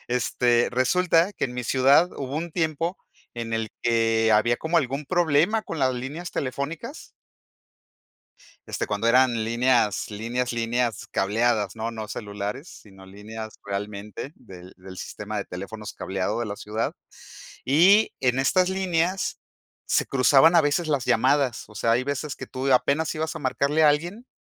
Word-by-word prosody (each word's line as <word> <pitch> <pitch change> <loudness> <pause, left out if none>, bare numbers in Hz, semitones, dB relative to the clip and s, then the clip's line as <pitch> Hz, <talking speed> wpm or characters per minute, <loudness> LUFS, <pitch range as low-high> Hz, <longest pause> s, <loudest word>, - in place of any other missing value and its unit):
Este, 120 0 +2
resulta 165 +8 +2
que - - -2
en 125 -2 -5
mi 125 - -3
ciudad 135 +8 +4
hubo 135 +1 -4
un 170 +2 -3
tiempo 165 +2 -1 0.4
en 115 -1 -5
el 110 -1 -2
que 115 -1 +2
había 120 +3 +3
como 160 +5 -1
algún 135 0 -2
problema 175 +6 +2
con 165 - -6
las 130 -1 +2
líneas 145 +8 -6
telefónicas. 140 - -4 1.6
Este, - - -3
cuando 105 +2 -1
eran 120 -2 +4
líneas 120 -1 +1
líneas 120 +4 -3
líneas 120 -1 -1
cableadas, 105 0 +1
¿no? 115 +1 -3
No 110 -2 -6
celulares, 105 - -5
sino 95 -2 -14
líneas 110 +3 -9
realmente 100 +5 -6
del 95 -6 -13
del 95 0 -12
sistema - - -6
de - - -3
teléfonos 100 +3 -7
cableado 95 +4 -3
de 120 - -2
la 100 - -4
ciudad. 110 +2 -3 0.7
Y 185 +10 +5
en 125 -1 +1
estas 180 +7 +3
líneas, 185 -1 -1 0.5
se - - +1
cruzaban 135 +5 +5
a - - +7
veces 150 +3 0
las 145 -5 0
llamadas, 130 +1 +2
o 105 - -16
sea, 115 - 0
hay 125 +2 +1
veces 140 +1 -3
que - - -8
tú 130 +1 -1
apenas 140 +5 +2
ibas 160 +1 -2
a - - -4
marcarle 140 +3 +1
a 155 - +7
alguien, 175 +11 -1
125 Hz, 155 wpm, -25 LUFS, 110-155 Hz, 1.6 s, a